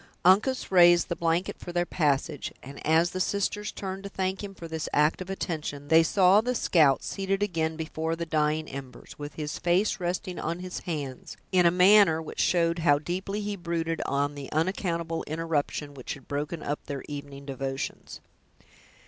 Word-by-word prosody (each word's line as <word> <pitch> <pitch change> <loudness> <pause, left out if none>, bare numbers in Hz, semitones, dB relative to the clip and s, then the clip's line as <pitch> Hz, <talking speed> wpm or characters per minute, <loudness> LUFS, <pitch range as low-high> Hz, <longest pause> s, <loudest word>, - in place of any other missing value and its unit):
Uncas 210 +9 +3
raised 175 -2 +6
the 170 - -1
blanket 170 +2 -1
for 175 - -7
their 175 0 +1
passage, 145 -5 0
and 140 +2 -10
as 160 +3 +3
the 185 - -4
sisters 205 +2 -1
turned 190 -1 -5
to 200 - -7
thank 190 +1 -2
him 195 -1 -7
for 170 - -8
this 160 -1 -4
act 150 +4 +3
of 185 - -6
attention, 150 -6 -4
they 160 0 +7
saw 190 +4 +5
the 250 +2 -1
scout 155 - +3
seated 195 0 -1
again 160 -5 -1
before 160 0 -3
the 170 0 -4
dying 155 -1 0
embers, 135 -1 -9
with 145 0 -7
his 150 0 -4
face 180 +5 +1
resting 180 +1 -3
on 165 +2 -2
his 180 0 -6
hands, 140 -6 -5
in 180 -2 +5
a - - +7
manner 180 -1 +6
which 160 - -8
showed 170 -1 +2
how 145 -3 +4
deeply 190 +6 -3
he 205 0 -3
brooded 170 -2 -2
on 145 +1 0
the 140 -2 -8
unaccountable 165 0 -1
interruption 155 -2 -2
which 130 0 -6
had 135 - -16
broken 150 +3 -3
up 145 +1 -3
their 140 -2 -4
evening 140 -1 -8
devotions. 135 0 -5
165 Hz, 180 wpm, -27 LUFS, 150-185 Hz, -, they